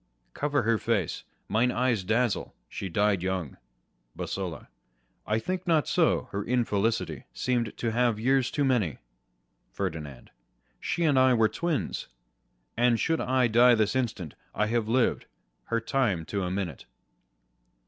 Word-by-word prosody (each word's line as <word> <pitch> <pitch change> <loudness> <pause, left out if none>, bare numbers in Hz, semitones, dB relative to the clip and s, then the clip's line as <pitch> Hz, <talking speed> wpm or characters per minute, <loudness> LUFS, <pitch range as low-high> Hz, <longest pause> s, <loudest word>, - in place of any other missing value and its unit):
Cover 145 -3 0
her 115 0 +2
face: 105 -9 -1 0.2
mine 115 +5 +2
eyes 120 -6 +1
dazzle; 115 +3 0
she 95 - -5
died 100 +1 +2
young. 95 -6 -3 0.6
Bosola. 90 -7 -5 0.6
I 105 - +1
think 185 +9 -3
not 160 -3 +3
so: 170 -3 +2
her 100 +1 -2
infelicity 115 -2 0
Seem'd 120 -4 -1
to 115 - -1
have 120 -1 +1
years 130 +2 +2
too 145 - 0
many. 115 - +1 0.7
Ferdinand. 80 -8 -5 0.5
She 170 - -1
and 145 -5 +4
I 130 -1 +5
were 110 -2 +4
twins: 170 +2 -2 0.7
And 120 -1 +3
should 165 0 +1
I 130 0 +2
die 120 +1 +6
this 110 +1 +1
instant, 110 - -2 0.2
I 105 - +2
had 115 0 0
lived 125 +1 +1 0.4
Her 115 - 0
time 115 -8 0
to 100 - 0
a - - -2
minute. 90 -6 -4
115 Hz, 140 wpm, -28 LUFS, 100-130 Hz, 0.7 s, die